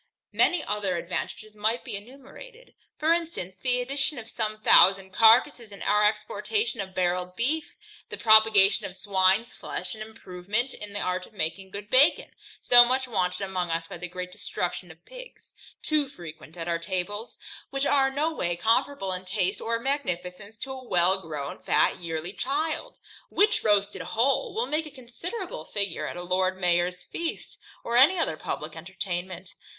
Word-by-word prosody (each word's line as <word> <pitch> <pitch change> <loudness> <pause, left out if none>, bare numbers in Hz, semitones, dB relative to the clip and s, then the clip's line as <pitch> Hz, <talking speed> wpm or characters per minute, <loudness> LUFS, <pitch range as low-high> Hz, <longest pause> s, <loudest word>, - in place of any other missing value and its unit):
Many 355 -3 +3
other 205 -4 -1
advantages 185 +5 -5
might 220 +3 0
be 235 -5 -5
enumerated. 275 - -12 0.2
For 315 +2 +3
instance, 330 - -4
the 250 -1 +1
addition 275 +3 -2
of 225 -1 -9
some 215 -1 -2
thousand 190 +1 +6
carcasses 230 +2 +4
in 200 - -9
our 210 0 +3
exportation 265 - -2
of 190 -1 -8
barrel'd 180 0 -1
beef: 295 +9 -1 0.3
the - - -5
propagation 220 -3 +6
of 180 - -11
swine's 195 +2 +1
flesh, - - -4
and 215 - -10
improvement 215 +2 -3
in 210 -1 -8
the 205 - -2
art 180 0 -2
of - - -23
making 190 +1 -3
good 205 +1 -8
bacon, 275 +5 +4 0.3
so 245 0 +9
much 255 +2 0
wanted 180 -5 -1
among 185 -2 -3
us 165 0 -2
by 170 - -9
the 180 - -5
great 180 +1 -6
destruction - - -4
of - - -16
pigs, - - -13 0.3
too 300 -3 +1
frequent 165 - -11
at 165 0 -5
our 170 -1 0
tables; 190 +5 -4 0.3
which 275 0 -1
are 270 -2 +3
no 300 +4 -1
way 175 - -2
comparable 220 +2 0
in 180 0 -5
taste 185 +1 -2
or 230 0 -1
magnificence 210 -6 -4
to 265 - -6
a 260 -1 -8
well 185 -3 +2
grown, 150 -5 -6
fat - - +2
yearling 170 +2 -4
child, 310 - -2 0.3
which 425 +1 +2
roasted 205 -1 +1
whole 275 - 0
will 455 +2 0
make 310 -3 -2
a - - -8
considerable 290 - -7
figure 200 -4 -2
at - - -6
a 175 - -6
Lord 185 +1 0
Mayor's 180 0 +2
feast, 335 -1 -5 0.2
or 235 0 0
any 295 +9 +6
other 325 - 0
publick 155 0 -5
entertainment. 180 +1 -5
210 Hz, 170 wpm, -26 LUFS, 180-265 Hz, 0.3 s, so